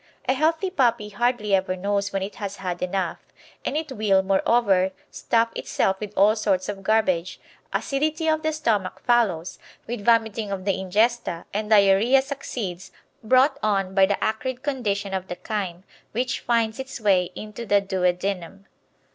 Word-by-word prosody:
A 260 - +4
healthy 325 +7 +1
puppy 235 -8 +1
hardly 240 -1 0
ever 190 -1 +2
knows 200 +2 -1
when 195 -1 -1
it 200 - -5
has 200 -2 -5
had 180 -3 -5
enough, 180 -1 -2 0.4
and 295 - -2
it 310 -2 -4
will, 205 -5 +2
moreover, 195 -1 +2 0.2
stuff 230 0 +1
itself 190 0 -1
with 210 -2 -5
all 205 +3 +5
sorts 195 -4 0
of 200 -1 -5
garbage; 190 -4 +1 0.3
acidity 310 +3 -1
of 315 0 +2
the 315 0 0
stomach 225 -11 -1
follows, 210 -9 +1 0.3
with 235 -2 -5
vomiting 225 -2 +2
of 190 -1 -4
the 200 - +2
ingesta, 190 -1 0
and 210 +1 -2
diarrhoea 215 +5 +5
succeeds, 225 -10 -5 0.3
brought 260 +5 +4
on 195 -3 0
by 195 -1 +5
the 200 - -1
acrid 250 +4 -2
condition 205 -8 -2
of 190 -1 -3
the 175 - -5
chyme, 190 -5 -3 0.3
which 250 +3 -1
finds 230 0 0
its 265 -1 -6
way 185 -5 +2
into 215 +2 -7
the 205 -3 +3
duodenum. 190 0 -2
205 Hz, 160 wpm, -24 LUFS, 190-240 Hz, 0.4 s, all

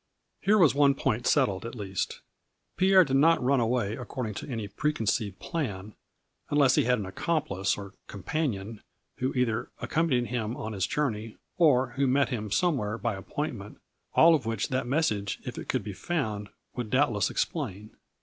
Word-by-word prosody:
Here 210 +2 +4
was 165 -8 +5
one 140 -1 +4
point 125 -3 -1
settled 120 -10 +2
at 115 +2 -6
least. 95 -4 -4 0.5
Pierre 190 0 +6
did 135 -1 +1
not 165 +4 +5
run 135 +1 +3
away 115 -3 0
according 125 -3 -5
to 105 - -7
any 115 -5 -3
pre 150 +9 -1
conceived 105 -7 -1
plan, 105 - -4 0.6
unless 140 -3 +4
he - - +3
had 125 +1 +3
an 105 - -4
accomplice 100 - -1
or 100 -1 -8
compan 145 - -2
ion, 105 +3 -8 0.4
who 130 +1 0
either 120 -3 0
accompanied 140 -8 0
him 120 0 -2
on 110 -6 -5
his 95 -2 -1
journey, 115 -7 -2 0.2
or 135 -7 +4
who 140 0 +2
met 140 +2 +3
him 110 -5 -3
somewhere 115 - 0
by 115 -1 -1
appointment, 105 +1 -5 0.4
all 165 +1 +7
of 140 -8 0
which 115 +5 -1
that 130 -2 -1
message, 110 -9 0
if 125 - -5
it - - -9
could 130 -5 0
be 100 0 -6
found, 105 - -3 0.3
would 120 -3 -4
doubtless 120 -7 +2
explain. 110 - -3
120 Hz, 175 wpm, -28 LUFS, 105-145 Hz, 0.6 s, all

